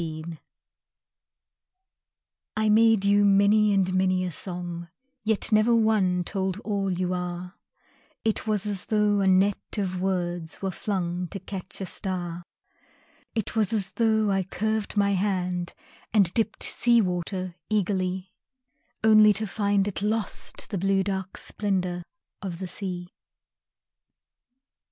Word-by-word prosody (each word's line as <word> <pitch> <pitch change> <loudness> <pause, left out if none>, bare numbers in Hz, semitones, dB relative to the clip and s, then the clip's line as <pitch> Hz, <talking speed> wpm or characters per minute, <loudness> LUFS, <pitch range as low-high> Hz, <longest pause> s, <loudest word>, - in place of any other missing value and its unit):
The 160 -1 -5
Net 165 0 -7 2.2
I 215 0 +2
made 220 -1 +5
you 205 +1 +4
many 205 +1 +5
and 190 -2 +2
many 185 0 +2
a 180 - -3
song, 175 0 -5 0.3
Yet 220 0 0
never 215 +2 +4
one 205 -5 +2
told 190 +1 -2
all 200 -3 -1
you 180 0 -1
are 180 0 -4 0.7
It 220 0 0
was 210 -2 +1
as 200 -3 0
though 210 -1 +2
a 195 - +2
net 190 +3 +2
of 185 -3 -2
words 175 -3 -2
Were 195 -1 -2
flung 180 -2 -2
to 195 - -7
catch 195 0 -7
a - - -2
star; 175 -2 -3 0.9
It 220 -1 -2
was 215 -4 +2
as 200 -4 +1
though 220 -2 +2
I 195 0 +2
curved 215 +3 -2
my 200 0 +3
hand 180 -3 -1 0.4
And 195 -5 +3
dipped 225 -1 0
sea 240 -1 +3
water 185 -1 -2 0.2
eagerly, 190 -2 -1 0.7
Only 215 -1 +7
to 215 +2 -2
find 200 -1 +1
it 200 - -3
lost 215 +1 -2
the 200 - -1
blue 195 +1 +2
Dark 190 -1 -3
splendor 185 -4 -1 0.4
of 185 -4 -5
the 185 +1 -5
sea. 180 -2 -5
195 Hz, 135 wpm, -26 LUFS, 180-210 Hz, 2.2 s, Only